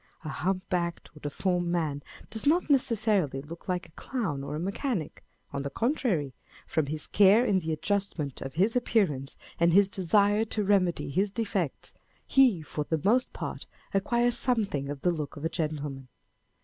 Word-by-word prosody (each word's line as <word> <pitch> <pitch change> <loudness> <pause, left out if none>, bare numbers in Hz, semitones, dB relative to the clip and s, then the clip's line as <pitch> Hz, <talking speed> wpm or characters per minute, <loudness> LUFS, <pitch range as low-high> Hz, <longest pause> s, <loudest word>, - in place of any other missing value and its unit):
A 155 - -5
hump 185 +7 -2
backed 170 -2 -2
or - - -12
deformed 175 +4 -1
man 160 -5 -1 0.3
does 220 +5 -2
not 320 0 +3
necessarily 215 - +2
look 165 +7 -10
like 180 0 -1
a - - -22
clown 165 - -3
or 145 - -4
a - - -3
mechanic; 195 - -3 0.3
on 140 - -2
the 140 - -3
contrary, 215 - 0 0.3
from 155 -3 0
his 155 +1 -1
care 205 +4 +5
in 195 -5 +3
the 160 -2 -3
adjustment 165 -3 -2
of 135 +1 -6
his 200 +8 +2
appear 220 -8 +2
ance, 135 +1 -9 0.2
and 170 0 +4
his 200 +1 +6
desire 205 +2 +3
to 215 -1 -1
remedy 190 -7 +1
his 195 +8 +1
defects, 200 - -3 0.3
he 245 - +4
for 150 0 -4
the 160 0 -1
most 245 +5 +3
part - - -6 0.3
acquires 235 +5 +2
something 200 - +1
of 145 -1 -5
the 180 - +2
look 155 -3 -5
of 145 - -6
a - - +1
gentleman. 145 -5 -4
180 Hz, 175 wpm, -28 LUFS, 150-210 Hz, 0.3 s, his